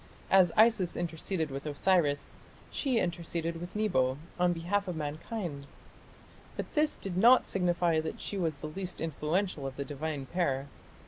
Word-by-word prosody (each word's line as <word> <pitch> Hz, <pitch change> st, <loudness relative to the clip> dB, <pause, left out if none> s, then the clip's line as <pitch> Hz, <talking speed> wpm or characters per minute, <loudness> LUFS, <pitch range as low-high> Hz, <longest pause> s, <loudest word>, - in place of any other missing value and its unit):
As 185 Hz, -3 st, +6 dB
Isis 220 Hz, -5 st, +4 dB
interceded 165 Hz, -1 st, -2 dB
with 140 Hz, +3 st, -5 dB
Osiris, 150 Hz, -1 st, +1 dB, 0.4 s
she 265 Hz, -5 st, 0 dB
interceded 170 Hz, -2 st, -2 dB
with 175 Hz, +3 st, -7 dB
Nebo, 130 Hz, -12 st, +2 dB, 0.2 s
on 180 Hz, 0 st, +4 dB
behalf 180 Hz, +4 st, -1 dB
of 180 Hz, -, -3 dB
mankind. 155 Hz, 0 st, -4 dB, 0.9 s
But -, -, -5 dB
this 300 Hz, 0 st, +2 dB
did 195 Hz, -3 st, -5 dB
not 240 Hz, +7 st, +6 dB
signify 175 Hz, -3 st, +2 dB
that 160 Hz, 0 st, -4 dB
she -, -, -5 dB
was 160 Hz, -6 st, -1 dB
the 155 Hz, -, -4 dB
least 185 Hz, +3 st, -5 dB
influential 160 Hz, 0 st, -1 dB
of 135 Hz, -, -6 dB
the 140 Hz, -, -4 dB
divine 145 Hz, -1 st, -4 dB
pair. 140 Hz, -3 st, 0 dB
170 Hz, 150 wpm, -31 LUFS, 150-190 Hz, 0.9 s, As